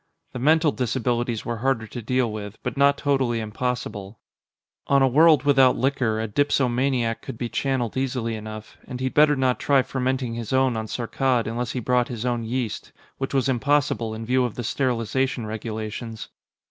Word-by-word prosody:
The 125 - -5
mental 155 +3 +4
disabilities 120 -2 -1
were 120 0 -3
harder 120 -1 0
to 120 +3 -7
deal 125 0 0
with, 105 0 -7
but - - -3
not 140 0 +4
totally 130 -5 +1
impossible. 110 -2 -4 0.7
On 140 -1 +4
a - - +5
world 155 +3 +5
without 135 -3 +5
liquor, 125 -4 0
a 110 - -2
dipsomaniac 125 -1 +1
could - - -7
be 120 0 -3
channeled 125 0 -1
easily 125 -3 -1
enough; 110 0 -8
and 125 - -6
he'd 130 0 -2
better 150 0 +5
not 130 -2 +1
try 140 -2 +3
fermenting 130 -2 -2
his 115 +1 -5
own 130 -2 +3
on 110 0 -3
Saarkkad 125 +1 0
unless 120 +1 -3
he 125 - -2
brought 125 +1 +1
his 120 -1 -5
own 120 -2 -1
yeast 120 -1 -3 0.3
which 135 - -3
was 135 -1 +2
impossible, 130 -3 +1
in 115 +1 -6
view 130 +2 +2
of 120 -3 -2
the 120 - -4
sterilization 125 0 -1
regulations. 110 +1 -5
125 Hz, 175 wpm, -24 LUFS, 115-135 Hz, 0.7 s, a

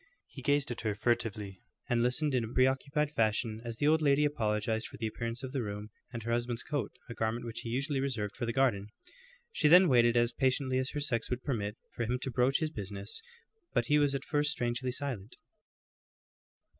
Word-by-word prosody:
He 135 - -11
gazed 145 +1 +2
at 120 - -4
her 110 -2 -1
furtively, 105 -4 -1 0.3
and 120 -2 +2
listened 130 +5 +1
in 125 -2 +2
a 110 - -5
preoccupied 135 +3 +2
fashion 110 -3 0
as 115 -1 -5
the 145 - +2
old 160 +1 +4
lady 145 0 +4
apologized 110 -4 0
for - - -11
the 115 - -3
appearance 115 +3 -4
of 130 - -4
the 135 -2 -1
room, 105 -1 -5 0.2
and 115 -1 -5
her 115 - -2
husband's 120 0 -1
coat, 145 -2 -2 0.2
a 120 - -6
garment 115 +1 -2
which 115 -1 -5
he 115 - -5
usually 135 +4 0
reserved 115 -7 -2
for 120 - -3
the - - +1
garden. 115 -6 +2 0.6
She 155 - +2
then 180 +4 +8
waited 120 -3 +5
as 120 0 +3
patiently 130 0 +1
as 130 0 -1
her - - 0
sex 130 -6 -1
would 125 0 -2
permit, 105 -6 -2 0.2
for - - -6
him 125 +3 0
to 130 - -2
broach 125 +4 +2
his 155 -1 0
business, 100 -3 -6 0.5
but 120 - +2
he 150 0 +5
was 145 -1 +2
at 135 - -4
first 150 -1 +1
strangely 125 -3 -1
silent. 125 -5 -4
120 Hz, 205 wpm, -31 LUFS, 115-140 Hz, 0.6 s, then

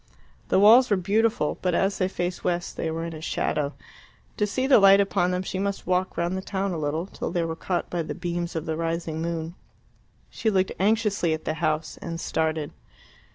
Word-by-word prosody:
The - - +3
walls 230 +6 +7
were 205 - +3
beautiful, 220 +5 +1
but 180 -2 +1
as 195 +2 +1
they 185 - +2
faced 175 -1 -3
west 175 -1 -1
they 160 - -2
were 165 +1 -3
in 165 -2 -7
shadow. 150 -2 -1 0.6
To 210 - +1
see 255 +6 -1
the 265 -3 +6
light 195 0 +7
upon 195 -2 +2
them 180 0 -1
she 185 - -4
must 200 0 -2
walk 185 +1 0
round 170 +2 0
the 190 - -3
town 195 0 -2
a 170 - -3
little, 155 +3 -1
till - - -5
they 175 -1 0
were 165 0 -3
caught 175 +2 -2
by 175 - -1
the 160 - -5
beams 175 0 -3
of 160 - -3
the 160 - -2
rising 165 -1 -2
moon. 165 0 -3 0.8
She 225 - 0
looked 190 -2 +1
anxiously 205 -4 +2
at 160 - -11
the 155 - 0
house, 155 -1 -1
and 165 -1 -5
started. 160 -2 -1
175 Hz, 205 wpm, -25 LUFS, 165-195 Hz, 0.8 s, walls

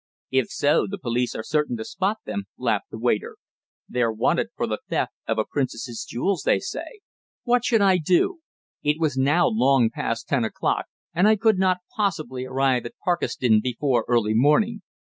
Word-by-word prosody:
"If 130 -2 +2
so, 145 +1 +2
the 200 - -4
police 125 -6 -1
are 110 - -4
certain 150 -4 0
to 110 - -6
spot 200 +3 -1
them," 200 - -4
laughed - - -1
the - - -8
waiter. 460 -1 -1 0.5
"They're 120 -2 0
wanted 110 0 +1
for - - -1
the - - -3
theft - - -1
of - - 0
a 110 - +1
princess's 120 -4 -3
jewels, 190 +11 -1
they - - +3
say." 435 -5 -7 0.4
What 245 -1 +2
should 230 -3 +3
I 190 -2 +4
do? 185 - +2 0.4
It 150 +1 +1
was 155 -5 0
now 145 +6 +3
long 125 +1 +3
past 115 0 -3
ten 135 -4 +1
o'clock, 110 - -1 0.3
and 180 +5 +3
I 220 - +6
could 215 -2 +2
not 185 -1 +2
possibly 155 -11 -2
arrive 130 -2 +1
at - - -14
Parkeston 125 -10 +2
before 125 0 0
early 115 -3 +2
morning. 150 - +3
145 Hz, 180 wpm, -24 LUFS, 120-195 Hz, 0.5 s, I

